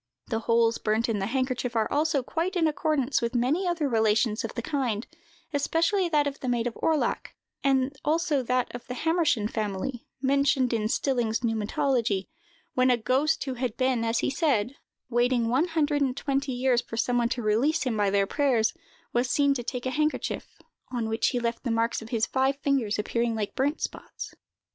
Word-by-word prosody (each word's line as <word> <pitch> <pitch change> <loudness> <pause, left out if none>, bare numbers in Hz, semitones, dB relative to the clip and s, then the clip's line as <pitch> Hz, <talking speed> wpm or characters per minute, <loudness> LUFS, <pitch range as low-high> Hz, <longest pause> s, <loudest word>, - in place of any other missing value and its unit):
The 225 - 0
holes 230 0 +2
burnt 220 +2 +1
in 220 -3 0
the 195 - -1
handkerchief 255 -1 -1
are 220 -1 +2
also 295 -2 +1
quite 340 +8 -2
in 340 -2 +2
accordance 295 -3 0
with 235 +1 -2
many 285 +10 +1
other 335 -4 0
relations 220 -1 +2
of 225 - -5
the 235 - -3
kind, 250 -7 -1 0.5
especially 330 +6 +1
that 300 -2 +3
of 280 -1 -3
the 255 - -3
maid 240 -1 0
of 240 - -1
Orlach, 315 -2 0 0.3
and 270 0 +2
also 310 -2 +1
that 250 0 0
of 245 - -8
the 250 - -5
Hammerschan 320 -9 +1
family, 215 +3 -3
mentioned 275 -1 +2
in 215 -1 0
"Stilling's 240 -4 0
Pneumatology," 225 -2 0 0.5
when 255 0 +3
a 250 - +4
ghost 265 +8 +1
who 265 - -3
had 245 -2 -3
been, 255 -3 +1
as 230 0 +1
he - - 0
said, 270 -6 +1 0.3
waiting 240 -1 +2
one 270 +8 +2
hundred 300 -3 +1
and 265 -1 0
twenty 275 0 -1
years 250 -1 +2
for 225 - -8
some 245 +1 +1
one 235 -1 +1
to 240 - -2
release 235 +10 +2
him 250 -4 -1
by 205 -2 +2
their 200 0 +2
prayers, 245 -2 +1 0.4
was 245 +1 +1
seen 280 +2 +3
to 260 - -3
take 250 +1 -4
a 255 - 0
handkerchief, 305 +2 -2 0.3
on 235 -3 -2
which 225 0 +1
he 250 - 0
left 235 -1 -2
the 255 - -2
marks 230 0 0
of 225 - -10
his 225 -2 +1
five 265 +1 +1
fingers, 265 -7 +1
appearing 230 +2 0
like 210 -2 -3
burnt 285 +4 0
spots. - - -6
250 Hz, 195 wpm, -27 LUFS, 230-280 Hz, 0.5 s, a